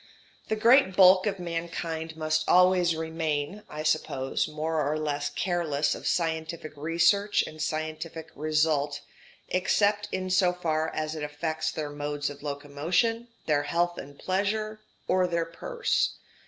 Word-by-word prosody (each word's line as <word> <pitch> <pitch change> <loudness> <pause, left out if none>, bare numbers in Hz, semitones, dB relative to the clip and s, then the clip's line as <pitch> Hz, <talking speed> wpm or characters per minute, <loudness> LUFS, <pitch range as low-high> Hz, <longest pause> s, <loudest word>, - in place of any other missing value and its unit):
The 220 - 0
great 230 -2 +5
bulk 185 +1 +7
of 200 -1 -1
mankind 165 -2 -4
must 155 0 0
always 180 -2 +5
remain, 160 +2 -2
I 150 +1 -5
suppose, 140 -4 0
more 155 +1 -1
or 150 +2 0
less 145 -1 -1
careless 160 -5 0
of - - -5
scientific 160 -2 -1
research 170 +7 +2
and 155 0 -8
scientific 155 +1 -4
result, 150 -1 +1 0.5
except 205 +3 +2
in 185 0 -2
so 185 -1 +4
far 160 -3 -1
as 155 -1 -3
it 155 - -5
affects 155 +2 -2
their 150 -2 -4
modes 145 0 -3
of 145 - -11
locomotion, 150 +12 -1 0.2
their 150 -2 +2
health 175 +3 0
and 140 +1 -10
pleasure, 215 +3 -1 0.3
or 185 0 +3
their 170 -1 0
purse. 465 - -1
160 Hz, 140 wpm, -28 LUFS, 155-180 Hz, 0.5 s, bulk